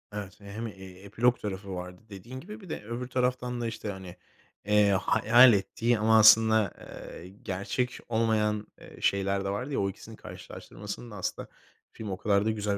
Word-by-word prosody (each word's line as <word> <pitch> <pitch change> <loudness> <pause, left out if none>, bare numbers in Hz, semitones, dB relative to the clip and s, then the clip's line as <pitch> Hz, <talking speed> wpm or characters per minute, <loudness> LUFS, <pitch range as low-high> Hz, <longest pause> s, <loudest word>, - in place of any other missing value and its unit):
Evet, 100 -2 -6
hem, 105 +3 -6
eee, 95 -2 -11
epilog 120 +5 +1
tarafı 100 -1 -5
vardı 90 0 -7
dediğin 110 +6 -9
gibi 210 +9 -10
bir 185 - -13
de - - -5
öbür 120 +3 -5
taraftan 125 -1 -1
da, 115 - -1
işte, 115 -2 -5
hani, 95 -2 -9 0.5
eee, 105 0 +4
hayal 115 +5 +6
ettiği 110 +4 0
ama 110 +1 +5
aslında, 110 -1 +6
eee, 85 - -10 0.2
gerçek 110 +7 -2
olmayan, 110 -2 +1
eee, - - -14
şeyler 100 0 +1
de - - -1
vardı 125 +9 -3
ya - - 0
o 100 - +1
ikisinin 110 +3 -10
karşılaştırmasında 105 +2 -9
aslında 95 - -4 0.4
film 110 -2 -7
o 95 - -3
kadar 100 +1 +2
da 110 - +2
güzel. 105 -2 -1
105 Hz, 175 wpm, -28 LUFS, 100-115 Hz, 0.5 s, hayal